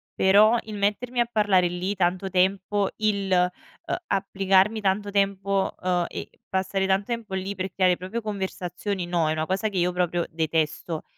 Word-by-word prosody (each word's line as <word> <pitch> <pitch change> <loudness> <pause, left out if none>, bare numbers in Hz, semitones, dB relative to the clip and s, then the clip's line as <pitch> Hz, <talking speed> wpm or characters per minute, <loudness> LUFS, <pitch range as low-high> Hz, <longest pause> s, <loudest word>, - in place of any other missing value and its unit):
però 210 +4 +5
il 215 -1 -7
mettermi 210 +5 -1
a 240 - +4
parlare 205 -5 +3
lì 180 +3 -2
tanto 185 +1 0
tempo, 190 +2 +1
il, 200 -3 0
uhm, 180 0 -1
applicarmi 195 +2 +2
tanto 205 +1 0
tempo, 195 -1 0
ehm, 180 -1 +1
e - - -6 0.2
passare 190 0 0
tan 195 +1 +2
tempo 230 -3 -4
lì 190 +1 -3
per 185 0 -4
creare 185 -2 +3
proprio 190 +6 -5
conversazioni, 190 -2 -4
no, 170 -2 +1
è - - +1
una 155 0 -1
cosa 190 +5 -1
che 200 - -5
io 180 0 +2
proprio 175 -1 0
detesto. 160 0 -1
190 Hz, 165 wpm, -25 LUFS, 180-200 Hz, 0.2 s, però